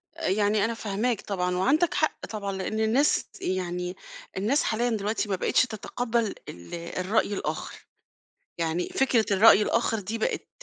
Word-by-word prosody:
يعني 205 +2 +1
أنا 230 - -1
فاهماك 220 +1 -1
طبعًا 180 -2 -1
وعندَك 305 - +2
حق 310 - 0
طبعًا؛ 200 -2 -4
لأن 190 +3 -3
الناس 235 +7 +2 0.2
يعني 180 -1 -2 0.4
الناس 235 +10 +2
حاليًا 235 +2 0
دلوقتي 215 -1 -1
ما 190 - +1
بقيتش - - +2
تتقبل 230 0 -2
ال 85 - -11
الرأي 185 +5 -1
الآخر، - - -5 0.7
يعني 165 +1 -1
فكرة 255 -4 +2
الرأي 210 +2 +7
الآخر 225 0 +1
دي 210 +4 -4
بقت 220 - -2
210 Hz, 140 wpm, -27 LUFS, 185-230 Hz, 0.7 s, الرأي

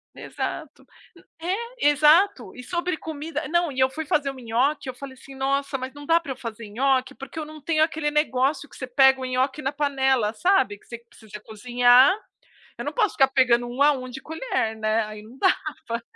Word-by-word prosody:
Exato. - - -6 0.6
N 335 - -6 0.3
é, - - +4
exato. 300 - +3
E 250 - -9
sobre 345 +5 -2
comida 315 +1 -5
não, 345 -1 +1
e 260 - -3
eu 260 - +5
fui 315 +4 -6
fazer 285 -1 0
um - - -9
nhoque, 260 +4 -1
eu - - -11
falei 265 +1 -9
assim: 270 +1 -14
"Nossa, 275 +1 -1
mas 260 +1 -7
não 290 0 -10
dá 330 +3 +3
para 300 -5 -6
eu - - -9
fazer 230 -2 -8
nhoque, 260 +4 0
porque 275 +4 -9
eu 310 - -4
não 310 -1 -12
tenho 310 0 +1
aquele 315 -1 0
negócio 290 -1 0
que - - -16
você 255 - -6
pega 265 +1 +4
o 260 - -4
nhoque 260 +3 -1
na 270 - -1
panela", 265 -6 +1
sabe, 345 - +2
que - - -27
s 235 -1 -10
se 220 -2 -18
você 210 +1 -8
cozinhar, 245 - +4 0.6
eu - - -6
não - - -3
posso 435 -6 +1
ficar 270 - +5
pegando 250 -3 +2
1 245 +3 -5
a 295 - +6
1 255 -3 -4
de 260 +2 -8
colher, 320 - -3
né, 220 +1 +1
aí 215 0 -9
não 230 +5 -15
dava. 290 -10 -1
270 Hz, 215 wpm, -24 LUFS, 245-300 Hz, 0.6 s, a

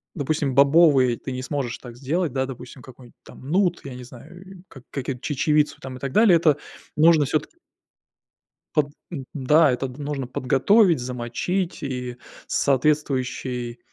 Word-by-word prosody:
допустим, 145 -3 -1
бобовые 140 -4 +5
ты 130 - -7
не 130 0 -5
сможешь 135 -4 -3
так 120 -2 -11
сделать, 150 +3 -1
да, 130 -1 0
допустим, 125 0 -10
какой-нибудь 125 -1 -15
там 130 - -13
нут, 180 -2 +2
я 135 -2 -8
не 125 - -9
знаю, 150 +9 -13 0.2
э, - - -14
как 135 -3 -14
какую-то, 130 -2 -5
чечевицу 150 +1 +1
там 130 -1 -7
и - - -13
так 135 0 -4
далее. 215 -5 +6
Это 155 -3 +3 0.4
нужно 155 -1 +5
всё-таки 155 - -3 1.2
Под 145 -1 +3 0.2
м, 140 -6 -6
да, 150 +2 +4
это 130 +1 -2
нужно 140 0 -5
подготовить, 135 - +3
замочить 125 +11 -3
и 125 -3 -5 0.3
соответствующий, 130 -4 -1
135 Hz, 150 wpm, -23 LUFS, 125-155 Hz, 1.2 s, далее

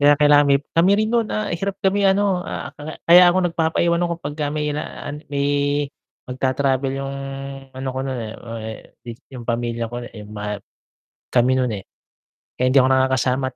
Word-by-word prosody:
Kaya 145 +1 +7
kailangan 145 0 +6
mi 140 - +5 0.2
kami 170 +3 +5
rin 215 +1 +2
no'n, 235 0 +2
ah, 215 -1 -1
hirap 195 +2 -4
kami 200 +1 +2
ano, 195 -2 +2
ah, - - -5
akala 150 +2 -9
kaya 175 +2 +9
ako 185 - +2
nagpapaiwan 170 +1 +1
ako 170 0 -1
'pagka 145 0 -3
may 150 0 -1
la 150 - -2 0.2
an 150 +1 -7
may 140 0 +1 0.8
magta-travel 130 +1 0
'yung 135 0 -4 0.6
ano 130 0 -5
ko - - 0
nun, 130 -2 -3
eh, 110 -1 -5
ah, 115 -1 -8
eh, 110 0 -8
dis 120 -2 -8 0.2
'yung 125 -2 -9
pamilya 115 -1 -1
ko, 120 +1 -6
eh, 115 -2 -10
ma 105 0 -5 0.8
kami 125 +1 +3
nun, 130 -1 +1
eh. 95 - -10 0.7
Kaya 125 - +2
hindi 135 +2 +5
ako 130 - +3
nakakasama 130 0 +2
140 Hz, 185 wpm, -21 LUFS, 125-170 Hz, 0.8 s, kaya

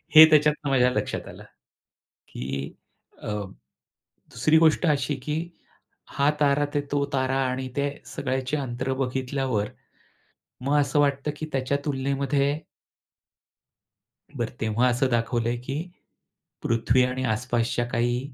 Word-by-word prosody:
हे 155 - +13
त्याच्यातनं 150 -1 +3
माझ्या 125 -1 +4
लक्षात - - -3
आलं, - - -11 0.9
की 70 +3 -5 0.5
अ, - - -6 1.0
2री 155 +7 +3
गोष्ट 160 +2 +4
अशी 145 -1 +1
की 150 0 -1 0.8
हा 140 +1 +4
तारा, 145 0 +3 0.3
तो 140 -1 +2
तारा 130 0 0
आणि 130 0 -3
त्या 140 0 +1 0.2
सगळ्याचे 130 +1 -2
अंतर 130 -1 -3
बघितल्यावर. 130 -4 -1 0.9
मग 140 +3 +2
असं 140 +1 +1
वाटतं 140 0 +1
की 155 - -5
त्याच्या 135 +1 0
तुलनेमध्ये 140 +1 0 1.8
बरं - - -2
तेव्हा 110 +3 +2
असं 125 +2 +2
दाखवलं 115 0 0
आहे 120 - -1
की 135 +4 -4 0.8
पृथ्वी 115 +2 +2
आणि 130 +1 -1
आस-पासच्या 120 +1 0
काही 120 +1 +1
130 Hz, 120 wpm, -25 LUFS, 120-145 Hz, 1.8 s, हे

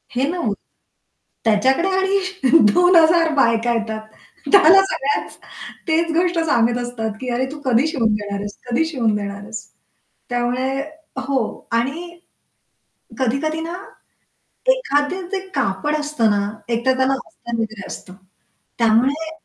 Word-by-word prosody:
हे 265 +3 +1
ना 350 0 -2 1.0
त्याच्याकडे 260 - +3
आणि 375 -5 +2 0.2
2000 335 -2 +5
बायका 235 -2 +2
येतात. 220 -1 -3 0.5
त्याला 390 -1 +8
सगळ्याच 280 +2 -2 0.5
तेच 330 +1 +1
गोष्ट 350 -1 +2
सांगत 240 -4 +2
असतात 235 -2 -4
की, 255 - -4
"अरे, 255 +2 0
तू 300 - -8
कधी 255 +4 +3
शिवून 235 -9 +1
देणार 205 -1 -4
आहेस? 205 0 -6
कधी 255 +7 +2
शिवून 240 -9 0
देणार 200 -1 -4
आहेस?" 220 +2 -7 0.7
त्यामुळे 245 +2 -1 0.6
हो. 275 -1 +1 0.4
आणि 340 +7 -4 1.0
कधी-कधी 280 +6 -1
ना, 340 +2 -5 1.0
एखादं 360 - -1
ते 385 - -1
कापड 275 +4 0
असतं 295 -7 0
ना, 205 0 +1 0.2
एकतर 240 +3 +1
त्याला 260 +1 +2
अस्तर 235 -1 -7
वगैर 220 -2 -5
असतं. 185 - -9 0.6
त्यामुळे 255 +8 +2
265 Hz, 125 wpm, -20 LUFS, 230-325 Hz, 1.0 s, त्याला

